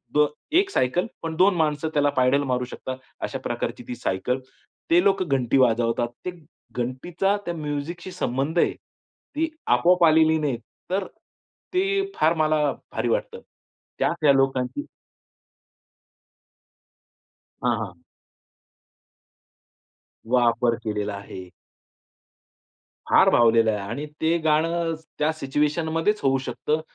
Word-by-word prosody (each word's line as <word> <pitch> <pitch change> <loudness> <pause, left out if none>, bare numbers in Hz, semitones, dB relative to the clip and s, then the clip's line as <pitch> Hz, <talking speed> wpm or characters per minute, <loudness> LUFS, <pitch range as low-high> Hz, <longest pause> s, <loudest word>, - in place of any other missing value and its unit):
The, 150 0 +6 0.3
एक 380 +5 +3
cycle 175 - +1 0.2
पण 165 -1 -4
दोन 185 +3 +4
माणसं 155 -1 0
त्याला 145 -1 +3
पायडल 130 +2 +3
मारू 125 -2 -1
शकतात 130 +1 -6 0.3
अशा - - -3
प्रकारची - - -4
ती 125 - -4
सायकल. 120 +3 -1 0.5
ते 175 +2 +5
लोक 195 -1 +3
घंटी 135 -5 +1
वाजवतात. 120 -2 +2 0.2
ते 180 - -2 0.4
घंटीचा 160 +11 -1
त्या 175 - -2
म्युझिकशी 155 +4 -5
संबंध 150 -1 -1
आहे. - - +3
ती 320 +2 -7 0.3
आपोआप 180 0 +3
आलेली 160 0 +5
नाही. 145 -6 -1 0.3
तर 190 +1 0 0.7
ते 390 +1 +1
फार 160 +2 +3
मला 155 -1 +2 0.3
भारी - - -2
वाटतं. - - -1 0.6
त्यात - - +1
त्या 150 -2 +6
लोकांची 135 -2 +1 2.8
हां, 120 -2 +2
हां. 100 -6 -6 2.3
वापर 120 0 +2
केलेला 105 -1 -2
आहे. 95 -2 -9 1.6
फार - - +6
भावलेलं 115 -1 +4
आहे 105 - -2
आणि 140 +7 -4 0.2
ते 165 +2 +3
गाणं 165 +2 +2 0.3
त्या 150 +1 +2
सिच्युएशनमध्येच 160 +6 0
होऊ 135 -1 +3
शकतं 155 +1 -1
150 Hz, 115 wpm, -24 LUFS, 125-170 Hz, 2.8 s, The